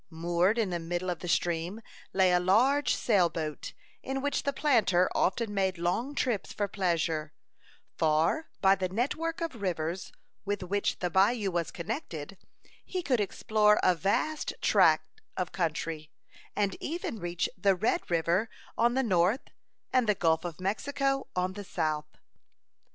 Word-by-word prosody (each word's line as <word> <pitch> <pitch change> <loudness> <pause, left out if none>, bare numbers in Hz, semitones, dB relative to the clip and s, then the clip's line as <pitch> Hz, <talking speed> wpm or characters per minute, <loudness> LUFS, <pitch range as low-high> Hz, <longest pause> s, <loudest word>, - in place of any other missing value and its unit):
Moored 175 +5 +1
in 215 -5 0
the 175 - -1
middle 175 +2 -2
of 175 - -4
the 180 - -6
stream 175 +3 0 0.3
lay 190 -1 +4
a 180 - +4
large 250 +10 +3
sail 195 -7 +3
boat, 155 -3 -5 0.3
in 270 0 -3
which 285 +1 -1
the 280 - 0
planter 230 -11 +3
often 210 +2 0
made 190 -2 0
long 225 +12 -1
trips 235 -8 -1
for 205 - -1
pleasure; 165 -5 -1 0.7
for, 160 - +2
by 195 -1 +6
the 185 -1 -1
network 310 - -2
of 310 -10 -4
rivers 175 -1 -2 0.3
with 205 -1 -2
which 200 +3 -1
the 180 -1 -1
bayou 200 +2 +3
was 170 -2 -1
connected, 185 - -6 0.4
he 365 -1 -4
could 255 -7 +1
explore 210 +1 +2
a 185 - +5
vast 200 - -1
tract 435 - +3 0.2
of 180 -2 -2
country, 160 -3 -2 0.5
and 200 -2 0
even 315 -8 -4
reach 175 -1 -1
the 200 -4 +3
Red 215 +5 0
River 170 +6 +1 0.3
on 240 +1 +2
the 265 - +2
north, 190 +3 +1 0.4
and 250 -4 +3
the 210 - +4
Gulf 160 -3 +2
of 175 -2 -6
Mexico 270 +8 -1
on 180 +1 0
the 205 +1 -7
south. 155 -5 -3
190 Hz, 155 wpm, -29 LUFS, 175-230 Hz, 0.7 s, by